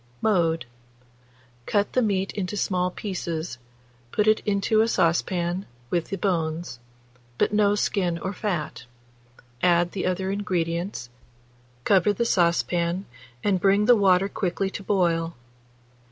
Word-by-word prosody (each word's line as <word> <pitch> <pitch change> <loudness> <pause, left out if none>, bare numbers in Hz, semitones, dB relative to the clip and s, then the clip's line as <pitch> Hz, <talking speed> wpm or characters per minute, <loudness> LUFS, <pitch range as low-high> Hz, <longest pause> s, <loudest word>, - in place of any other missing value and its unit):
Mode. 165 - +1 1.0
Cut 205 -1 +1
the 255 - +3
meat 195 -4 0
into 200 +1 -4
small 180 -2 0
pieces, 170 - -4 0.5
put 210 - +1
it 215 0 +5
into 205 +2 +2
a 225 - +3
saucepan 175 -1 0 0.2
with 170 -2 -1
the 195 - -3
bones, 165 - -2 0.6
but - - +1
no 205 -1 +3
skin 180 -4 0
or 185 +3 -4
fat; 175 - -3 0.8
add 175 -1 +3
the 185 - -2
other 190 +1 -1
ingredients; 175 - -2 0.7
cover 200 +4 +4
the 235 +4 -1
saucepan, 175 -1 +1 0.4
and 195 -3 +2
bring 200 +1 +4
the 245 - +7
water 195 -2 +4
quickly 195 0 -2
to - - -6
boil. 170 -4 0
185 Hz, 125 wpm, -25 LUFS, 170-200 Hz, 1.0 s, the